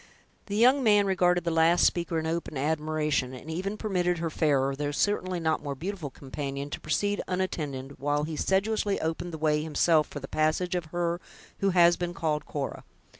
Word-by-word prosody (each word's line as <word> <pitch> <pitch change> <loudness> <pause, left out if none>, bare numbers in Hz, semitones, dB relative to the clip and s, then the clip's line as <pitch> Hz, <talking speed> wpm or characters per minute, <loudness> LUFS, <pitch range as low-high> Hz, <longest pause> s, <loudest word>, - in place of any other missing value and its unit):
The 200 - -3
young 255 +6 +5
man 205 -3 +5
regarded 180 -2 +2
the 170 - 0
last 165 +2 +4
speaker 170 -1 +1
in 160 - -1
open 160 -2 -3
admiration, 150 -2 0
and 150 +5 -8
even 195 +5 -3
permitted 180 -5 0
her 165 -1 -2
fairer, 140 -4 +1
though 145 +1 -2
certainly 185 +3 0
not 160 -1 0
more 145 -2 -4
beautiful 175 0 -5
companion, 140 +1 -6
to - - -4
proceed 205 +7 0
unattended, 145 -8 -3
while 145 +2 0
he 155 +1 -4
sedulously 200 +4 +1
opened 165 +2 -3
the 160 - -5
way 150 -1 +1
himself 155 0 +2
for 145 - -7
the 135 - -8
passage 155 +5 0
of 175 -2 -1
her 175 +2 -2 0.4
who 195 - +2
has 175 -2 +5
been 175 0 -3
called 155 -2 -1
Cora. 140 -2 -4
160 Hz, 185 wpm, -28 LUFS, 150-180 Hz, 0.4 s, young